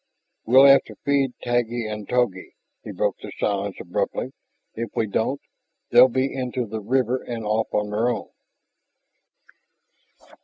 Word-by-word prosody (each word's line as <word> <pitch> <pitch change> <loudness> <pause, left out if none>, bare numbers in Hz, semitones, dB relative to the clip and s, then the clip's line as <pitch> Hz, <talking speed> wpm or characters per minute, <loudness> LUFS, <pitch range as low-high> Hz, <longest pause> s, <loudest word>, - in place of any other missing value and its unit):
"We'll 130 +4 +7
have 140 0 +8
to - - -12
feed 140 -2 +1
Taggi 120 -1 -1
and 105 -1 -6
Togi," 120 -7 -1 0.3
he - - -7
broke - - -1
the - - -9
silence 100 -1 -1
abruptly. 85 - -3 0.4
"If 115 +1 -4
we 110 - +1
don't, 110 +6 -1 0.5
they'll - - +8
be 130 +2 -1
into 125 -1 -3
the 110 0 -6
river 125 +3 0
and 115 -2 -6
off 110 +1 0
on 105 0 -1
their 110 +4 +1
own." 115 -5 -4
120 Hz, 145 wpm, -23 LUFS, 105-130 Hz, 0.5 s, have